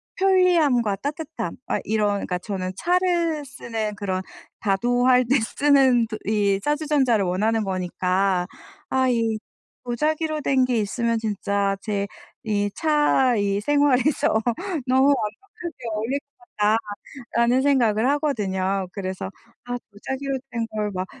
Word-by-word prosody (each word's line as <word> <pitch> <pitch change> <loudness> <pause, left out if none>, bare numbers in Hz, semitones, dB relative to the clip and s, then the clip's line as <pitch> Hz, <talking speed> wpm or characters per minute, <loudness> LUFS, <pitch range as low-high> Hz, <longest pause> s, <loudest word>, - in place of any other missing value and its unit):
편리함과 335 - +3
따뜻함. 290 - -4
아 - - 0
이런 210 -1 +1
그러니까 180 -2 -2
저는 185 -1 -4
차를 345 -4 +1
쓰는 225 -5 -4
그런 190 -2 -2 0.4
다도 240 +5 +1
할 250 -1 +5
때 270 +1 +4
쓰는 260 -2 +3 0.2
이 200 -2 +2
찻주전자를 290 -8 +2
원하는 215 +5 +1
거니까 185 0 0 0.4
'아 260 0 +2
이 230 -2 +1 0.5
도자기로 305 +5 -1
된 260 -2 +3
게 245 -2 0
있으면 230 +3 0
진짜 200 -2 -1
제 200 -2 -2 0.4
이 205 -1 0
차 295 -5 +3
이 200 0 0
생활에서 285 -4 +2 0.5
너무 260 +2 +4
완벽하게 330 - -2 0.2
어울릴 240 +7 -1 0.2
거다.'라는 210 -2 -1 0.6
생각을 245 -4 +3
하거든요. 195 - 0
그래서 190 -1 -4 0.3
'아 245 0 -3
도자기로 265 +5 -4
된 230 -1 -2
걸 210 -1 -1
막 185 0 -3
230 Hz, 260 characters per minute, -23 LUFS, 200-280 Hz, 0.6 s, 할